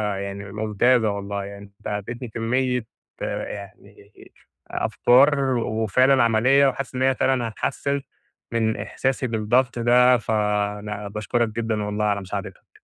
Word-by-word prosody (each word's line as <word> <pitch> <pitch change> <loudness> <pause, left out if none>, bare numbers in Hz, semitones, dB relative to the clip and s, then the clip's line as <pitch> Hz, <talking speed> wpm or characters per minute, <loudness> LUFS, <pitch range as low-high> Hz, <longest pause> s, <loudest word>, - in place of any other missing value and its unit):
يعني 100 0 -6
ممتازة 110 +3 +2
والله 100 0 -4
يعني 100 0 -9
أنت - - -8
اديتني 115 +5 -4
كميّة 125 +2 -1 0.4
آآ - - -3
يعني 100 -2 -12 0.6
أفكار 135 +1 +3
وفعلًا 120 +4 +2
عمليّة 125 +5 +4
وحاسس 135 0 -3
إن 130 - -2
هي 130 0 +3
فعلًا 125 -3 +1
هتحسن 140 +6 -2 0.5
من 110 -1 0
إحساسي 130 +5 -2
بالضبط 120 +3 +1
ده، 125 +1 +5
فأنا 105 -1 -2
باشكرك 110 +3 -1
جدًا 110 -1 -2
والله 105 +1 -1
على 100 -1 0
مساعدتك. 95 - -8
115 Hz, 125 wpm, -23 LUFS, 105-125 Hz, 0.6 s, ده